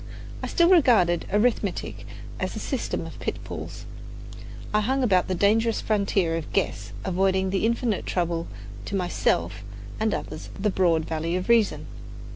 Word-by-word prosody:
I - - -3
still 340 -2 +3
regarded 230 - +4
arithmetic 210 -2 0 0.3
as - - -2
a - - -4
system - - -3
of - - -9
pitfalls. - - -6 0.9
I 210 - +3
hung 265 +5 +1
about 185 -7 +3
the 185 - -1
dangerous 220 +5 +2
frontier 195 -5 +1
of 160 - -6
"guess," 195 - -1
avoiding 190 0 +1
with 195 - 0
infinite 230 -2 0
trouble 170 -2 -1 0.4
to - - -4
myself 105 - 0 0.4
and 220 0 +1
others 155 -5 -5
the 210 +1 +1
broad 170 -4 +2
valley 165 +2 -2
of 185 +4 -3
reason. 230 -3 +3
195 Hz, 145 wpm, -25 LUFS, 175-220 Hz, 0.9 s, regarded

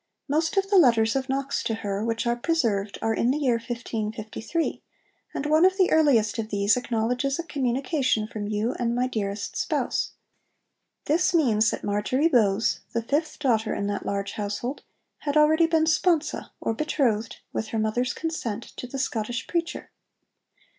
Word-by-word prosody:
Most 320 +5 0
of 390 0 +3
the 395 - +7
letters 230 -6 +4
of 265 0 -1
Knox 275 +1 -1
to 225 - -1
her 200 -1 -3
which 230 +1 -1
are 235 0 +2
preserved 230 - 0
are 225 0 +2
in 235 - +1
the 270 - +2
year 250 -6 +1
1553, 230 +4 -3 0.5
and 280 - -2
one 310 +2 +4
of 375 +1 +4
the 375 -2 +3
earliest 250 -9 +3
of 220 -1 -3
these 200 +1 +3
acknowledges 250 +3 -1
a 335 - -3
communication 260 -4 0
'from 215 -2 -5
you 215 +4 -1
and 235 -1 0
my 250 +1 +1
dearest 205 -4 -3
spouse.' - - -1 0.9
This 345 +4 +2
means 220 -9 +4
that - - -4
Marjory 210 +9 +1
Bowes, 220 -7 +2
the 230 -1 -1
fifth 300 +6 -1
daughter 230 -6 +1
in 200 - -2
that 205 0 -2
large 200 0 -2
household, 210 +6 -4 0.4
had 290 0 -1
already 315 +2 +5
been 325 -1 +3
sponsa 320 0 +1
or - - -1
betrothed, 235 -5 0 0.2
with 220 - -2
her 225 - -3
mother's 220 +3 0
consent, 240 -9 -3
to 250 - -5
the 270 - -6
Scottish 240 -2 -2
preacher. 340 0 -3
240 Hz, 165 wpm, -25 LUFS, 220-300 Hz, 0.9 s, the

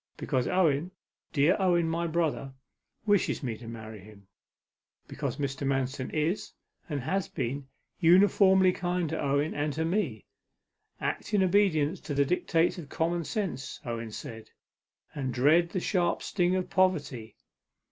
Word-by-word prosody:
'Because 125 -2 -1
Owen, 165 -3 +2 0.4
dear 150 +5 +4
Owen 175 -3 +3
my 170 +1 -1
brother, 155 -5 -1 0.5
wishes 205 -7 +2
me 120 -4 -2
to 115 - -10
marry 110 -2 -8
him. 100 0 -15 0.8
Because - - -4
Mr. 140 -1 -3
Manston 135 -1 -1
is, 160 +5 -1 0.4
and 145 -2 -2
has 190 +8 -1
been, 135 0 -4 0.3
uniformly 190 +1 +5
kind 180 -2 -1
to 160 - -3
Owen, 140 +2 +1
and 145 +1 -1
to 160 +3 -1
me. 165 - -1 0.7
"Act 210 - -2
in 195 - +4
obedience 180 -4 +2
to 155 -7 -5
the 140 0 +3
dictates 170 +2 +1
of 150 -5 -9
common 170 +1 -1
sense," 165 - -3
Owen 115 -1 -4
said, 110 +1 -8 0.6
"and 130 -4 -3
dread 155 +7 +4
the 185 - -2
sharp 175 -2 0
sting 180 -1 +1
of 185 -1 -2
poverty. 145 - 0
160 Hz, 145 wpm, -29 LUFS, 135-180 Hz, 0.8 s, uniformly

